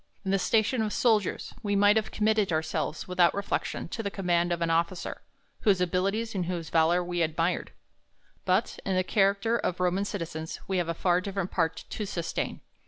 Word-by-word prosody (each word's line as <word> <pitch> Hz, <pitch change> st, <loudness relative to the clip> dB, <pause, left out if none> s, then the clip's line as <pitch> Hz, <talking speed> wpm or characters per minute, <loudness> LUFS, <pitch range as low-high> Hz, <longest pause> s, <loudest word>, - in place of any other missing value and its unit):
In 190 Hz, -, 0 dB
the 195 Hz, -, +3 dB
station 220 Hz, +4 st, +2 dB
of 215 Hz, -1 st, -1 dB
soldiers, 220 Hz, -5 st, +1 dB
we 205 Hz, -1 st, 0 dB
might 205 Hz, +1 st, +5 dB
have 220 Hz, -1 st, +1 dB
committed 215 Hz, -3 st, +1 dB
ourselves, 160 Hz, 0 st, -2 dB
without 180 Hz, -2 st, +3 dB
reflection, 200 Hz, 0 st, -2 dB
to 225 Hz, -, -4 dB
the 200 Hz, -, -2 dB
command 175 Hz, -3 st, 0 dB
of 170 Hz, -1 st, 0 dB
an 165 Hz, -, +1 dB
officer, 170 Hz, +2 st, -1 dB, 0.4 s
whose 200 Hz, -4 st, +3 dB
abilities 195 Hz, +6 st, 0 dB
and 180 Hz, -4 st, -2 dB
whose 170 Hz, -3 st, -4 dB
valour 170 Hz, +2 st, +3 dB
we 175 Hz, 0 st, -2 dB
admired; 165 Hz, +2 st, 0 dB, 0.7 s
but, -, -, +1 dB
in 190 Hz, -, -1 dB
the 185 Hz, -, +2 dB
character 200 Hz, +4 st, +2 dB
of 180 Hz, -, -2 dB
Roman 180 Hz, +2 st, +1 dB
citizens, 160 Hz, -5 st, -5 dB
we 190 Hz, -1 st, 0 dB
have 170 Hz, -1 st, -1 dB
a 165 Hz, -, -1 dB
far 180 Hz, +1 st, +2 dB
different 195 Hz, -1 st, -3 dB
part 165 Hz, -2 st, -1 dB
to 210 Hz, -, -4 dB
sustain. 170 Hz, -3 st, -3 dB
185 Hz, 185 wpm, -28 LUFS, 170-205 Hz, 0.7 s, might